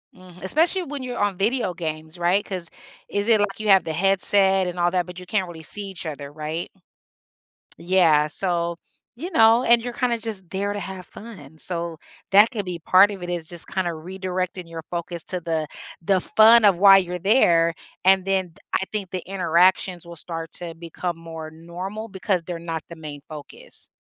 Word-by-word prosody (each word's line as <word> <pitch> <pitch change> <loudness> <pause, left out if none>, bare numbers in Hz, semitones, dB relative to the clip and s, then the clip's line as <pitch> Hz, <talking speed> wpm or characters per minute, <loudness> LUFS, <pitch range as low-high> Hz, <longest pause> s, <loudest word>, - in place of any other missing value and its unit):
Mhm, 185 -1 -15
especially 330 - +1
when 285 -4 -6
you're 250 -1 -5
on 205 -3 0
video 215 -1 0
games, 155 -1 -6
right? 175 +4 +2
'Cause 180 -4 -5 0.4
is 205 +2 -2
it 220 -2 +5
like 200 -1 -1
you 215 -1 -2
have 190 -1 +6
the 160 - -3
headset 195 +1 +3
and 180 0 -5
all 175 0 +2
that, 180 -1 0
but 180 0 -9
you 180 - -10
can't 190 0 -1
really 165 -2 -10
see 205 +6 0
each 190 -3 -7
other, 145 -2 -6
right? 155 +3 -5 1.1
Yeah, 170 -4 +3
so, 170 0 0 0.4
you 335 +10 -6
know, 225 -1 +5
and 235 -1 +5
you're 245 +1 -5
kinda 240 -1 0
just 210 -6 -6
there 200 +1 -2
to 205 - -4
have 190 -2 -7
fun, 170 -11 -12
so 170 0 -4 0.3
that 205 +3 +7
could 210 -5 -4
be 180 -2 -5
part 185 +5 +5
of 195 -3 -8
it, 175 - -5
it's 175 -2 -3
just 170 -1 -9
kinda 185 -2 -1
redirecting 185 +1 -4
your 165 -1 -7
focus 170 -1 -4
to 180 - -3
the 160 -2 -2 0.3
the 190 +3 +2
fun 220 +4 +6
of 195 -4 +5
why 195 +1 +8
you're 180 -1 -1
there, 170 -5 +4 0.3
and 190 0 +4
then 190 -3 -1 0.2
I - - +1
think 200 -4 -4
the 185 - -2
interactions 180 -1 +2
will 170 0 -10
start 165 -1 -6
to 170 -2 -6
become 170 +1 -5
more 165 -1 -8
normal 180 +7 -7
because 190 -3 -1
they're 170 0 -5
not 165 -1 -5
the 170 - -9
main 150 -3 -9
focus. 150 -2 -6
180 Hz, 195 wpm, -23 LUFS, 170-200 Hz, 1.1 s, why